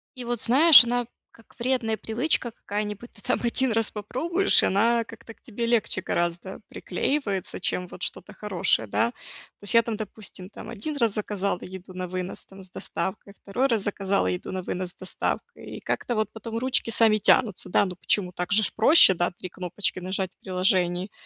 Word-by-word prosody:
и 250 - -7
вот, 240 -1 -2
знаешь, 280 +3 +9
она 245 0 -1 0.3
как 225 - -21
вредная 235 -3 0
привычка 240 +1 0
какая-нибудь: 210 +1 -5
ты 205 - -20
там 250 - 0
1 240 0 +1
раз 225 -1 0
попробуешь, 330 - +1
и - - +4
она 230 +4 +2
как-то 225 0 -12
к - - -37
тебе 235 -1 -4
легче 230 -5 0
гораздо 175 +3 -3
приклеивается, 205 -11 -2
чем 180 0 -2
вот 185 - -9
что-то 210 - -6
хорошее, 185 - 0
да. 230 - +1
То 225 - -16
есть 205 - +1
я 230 - +7
там, 220 -2 -4
допустим, 205 -3 -7
там 220 - -10
1 235 +7 -5
раз 230 -6 +1
заказала 200 -3 -2
еду 185 0 -10
на 185 0 -5
вынос, 185 +1 -5
там, 195 0 -14
с 185 - -18
доставкой, 200 +1 -5
второй 225 +7 -1
раз 225 -5 +1
заказала 195 - 0
еду 90 - -3
на 185 - -3
вынос 180 0 -4
с - - -30
доставкой, 190 - -4
и - - -8
как-то 240 - -2
вот 215 -1 -1
потом 225 +1 -6
ручки 255 -1 +1
сами 225 -1 +4
тянутся. 210 -1 +2
Да, - - +3
ну 180 -1 -6
почему, 180 -2 +1
так 180 +2 -3
же 215 +1 +4
ж - - +1
проще, 220 - +7
да, 175 0 0
3 180 +1 -8
кнопочки 185 +1 -2
нажать 185 0 -3
в - - -45
приложении. 185 0 0
210 Hz, 195 wpm, -25 LUFS, 185-235 Hz, 0.3 s, знаешь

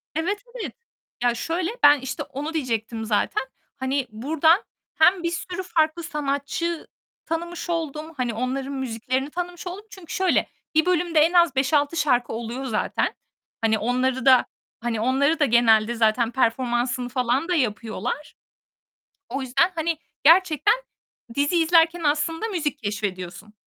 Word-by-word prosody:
Evet, 370 +6 -1 0.2
evet. - - -5 0.5
Ya, 240 -1 +3
şöyle: 335 - -2
Ben 290 -1 +8
işte 260 0 -4
onu 295 +4 -6
diyecektim 230 -6 -2
zaten. 215 +3 0 0.3
Hani 265 0 -1
buradan 315 - +2 0.3
hem 350 +3 +4
bir 340 - 0
sürü 355 +2 -4
farklı 320 -1 +1
sanatçı 300 +3 -2 0.4
tanımış 340 +2 -4
oldum. 320 -1 -3
Hani 245 -2 -1
onların 260 +4 -3
müziklerini 260 +1 -2
tanımış 355 +2 -5
oldum. 390 +4 -7
Çünkü 370 -5 -10
şöyle: 375 -1 +2 0.3
Bir 315 +2 +4
bölümde 345 -3 +2
en 325 +3 +4
az 340 -5 +4
5-6 285 +4 +2
şarkı 250 -5 +1
oluyor 235 +3 -5
zaten. 225 -5 -1 0.5
Hani 220 -1 +2
onları 255 +3 0
da 260 -2 +6 0.3
hani 230 -2 -2
onları 280 +6 +2
da 295 - +4
genelde 230 -2 +4
zaten 225 +1 +2
performansını 245 0 0
falan 255 +5 0
da 360 - +1
yapıyorlar. 235 - -2 1.0
O 270 +4 -3
yüzdeni, 270 +8 +2
hani, 325 0 -1 0.3
gerçekten 340 +4 +5 0.6
diziyi 290 +4 +2
izlerken 335 +1 +3
aslında 325 +7 0
müzik 305 -8 -2
keşfediyorsun. 205 -2 -5
280 Hz, 135 wpm, -24 LUFS, 240-330 Hz, 1.0 s, Ben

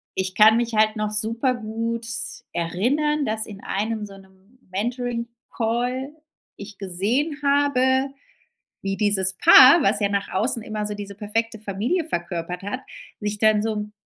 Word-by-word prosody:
ich 190 0 -2
kann 220 +1 +7
mich 235 -1 -1
halt 215 +1 +3
noch 215 0 -2
super 230 +4 +1
gut 230 +1 -4
s 225 -1 -6
erinnern 270 - 0
dass 220 -1 -2
in 205 -2 -10
einem 215 +2 -3
so 195 -1 -12
'nem 190 +5 -22
Mentoring-Call 240 +3 -3 0.5
ich 200 0 -10
gesehen 220 - -1
habe 275 -2 +2 0.7
wie 195 0 -2
dieses 190 -2 +2
Paar 290 0 +8
was 205 -4 +2
ja 200 - +2
nach 200 0 -2
außen 230 +3 0
immer 215 -1 -4
so 210 - -4
diese 200 -1 -8
perfekte 225 +2 -2
Familie 215 - -2
verkörpert 175 - -4
hat, 205 +7 -4 0.4
sich 210 0 -3
dann 215 0 +3
so 225 0 -1
'n 210 0 -5
220 Hz, 155 wpm, -23 LUFS, 200-245 Hz, 0.7 s, Paar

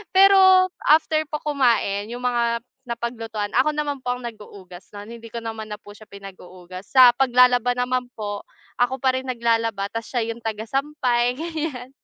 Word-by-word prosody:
pero 380 -1 +6 0.2
after 310 +1 +3
po 300 0 -5
kumain 235 -8 +1
yung 245 - -7
mga 235 -1 0 0.2
napaglutuan 230 -3 -4
ako 300 +4 +3
naman 295 -1 -2
po 245 - 0
ang 250 - -8
naghuhugas 200 -5 -11
nun 205 +2 -9
hindi 230 0 -11
ko 235 - -5
naman 225 -1 -6
na 210 - -9
po 205 0 -14
siya 215 - -15
pinaghuhugas 185 -2 -12
sa 255 -2 +9
paglalaba 250 -1 +4
naman 250 0 -1
po 205 -2 -6 0.3
ako 245 +1 0
pa 260 -1 +2
rin 260 - -6
naglalaba 230 -5 -1
tapos 230 +3 -7
siya 230 -2 -1
yung 230 0 -7
taga 220 0 -4
sampay 255 -3 0
gan'yan. 305 -4 -5
240 Hz, 170 wpm, -22 LUFS, 220-265 Hz, 0.3 s, sa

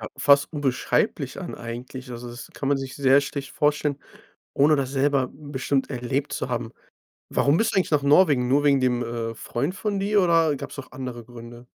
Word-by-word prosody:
ja, - - -6
fast 140 +1 +4
unbeschreiblich 140 -4 -1
an - - -6
eigentlich, 125 +2 -8
also, 120 0 -7
das 120 +4 -9
kann 135 - -4
man 145 - +3
sich 135 -1 -6
sehr 135 0 +5
schlecht 140 0 -5
vorstellen, 150 -1 +1 0.6
ohne 150 +2 +4
das 135 -2 -2
selber 140 -1 +1
bestimmt 140 -1 -2
erlebt 130 +2 -2
zu - - -3
haben. 120 -2 -3 0.6
Warum 140 +3 +2
bist 225 - +1
du - - 0
eigentlich 190 - +2
nach 150 -2 +2
Norwegen? 145 -4 +4
Nur 140 +3 +3
wegen 140 -2 +4
dem, 125 -1 +1
äh, 115 -1 -3
Freund 140 - -3
von 205 -1 -2
dir 205 +1 +2
oder 165 -4 +3
gab's - - -8
auch 140 - -9
andere 125 -3 -6
Gründe? 120 0 -12
135 Hz, 195 wpm, -24 LUFS, 125-145 Hz, 0.6 s, sehr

